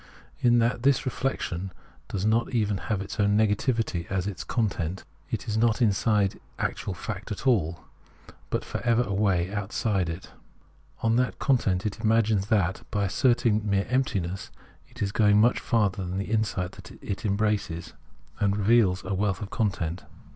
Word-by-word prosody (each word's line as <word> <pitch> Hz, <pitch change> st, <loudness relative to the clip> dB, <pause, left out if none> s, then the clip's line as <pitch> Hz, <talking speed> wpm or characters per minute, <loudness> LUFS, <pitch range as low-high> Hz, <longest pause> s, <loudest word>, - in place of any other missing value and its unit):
In 120 Hz, -1 st, +4 dB
that 120 Hz, +1 st, +2 dB
this 135 Hz, 0 st, +3 dB
reflec 135 Hz, 0 st, -2 dB
tion 90 Hz, +2 st, -4 dB, 0.4 s
does 100 Hz, 0 st, -3 dB
not 115 Hz, +3 st, +1 dB
even 105 Hz, -3 st, +1 dB
have 105 Hz, -3 st, 0 dB
its 100 Hz, -, -8 dB
own 100 Hz, 0 st, +3 dB
negativity 110 Hz, -4 st, +1 dB
as 95 Hz, -2 st, -1 dB
its 100 Hz, -3 st, -4 dB
content, 95 Hz, -6 st, -2 dB, 0.3 s
it -, -, -4 dB
is 110 Hz, 0 st, -1 dB
not 115 Hz, 0 st, +3 dB
inside 105 Hz, -3 st, +2 dB, 0.2 s
actual 95 Hz, -, -2 dB
fact 105 Hz, +3 st, -6 dB
at 105 Hz, -, -5 dB
all, 90 Hz, -10 st, +2 dB, 0.7 s
but -, -, -2 dB
for -, -, -4 dB
ever 120 Hz, 0 st, +3 dB
away 100 Hz, -4 st, 0 dB
outside 100 Hz, -2 st, -1 dB
it. 85 Hz, +3 st, -7 dB, 0.7 s
On 115 Hz, +1 st, +3 dB
that 125 Hz, 0 st, +1 dB
account 100 Hz, -9 st, +1 dB
it 105 Hz, -, -3 dB
imagines 110 Hz, -3 st, +2 dB
that 95 Hz, -4 st, +1 dB
by 100 Hz, -1 st, 0 dB
as 95 Hz, -, -3 dB
serting 120 Hz, -4 st, +3 dB
mere 100 Hz, -1 st, +1 dB
emptiness 95 Hz, -9 st, -1 dB, 0.4 s
it 125 Hz, -3 st, -5 dB
is 100 Hz, -, -1 dB
going 105 Hz, -1 st, +4 dB
much 120 Hz, +3 st, +4 dB
farther 100 Hz, -5 st, +1 dB
than 90 Hz, +1 st, -3 dB
insight 100 Hz, -3 st, -1 dB
that 100 Hz, -, -7 dB
embraces 100 Hz, -5 st, -1 dB, 0.5 s
and 100 Hz, 0 st, +2 dB
reveals 105 Hz, -3 st, +3 dB
a -, -, -2 dB
wealth 95 Hz, -1 st, 0 dB
of 100 Hz, -, -7 dB
content. 90 Hz, -5 st, -1 dB
105 Hz, 160 wpm, -27 LUFS, 95-115 Hz, 0.7 s, In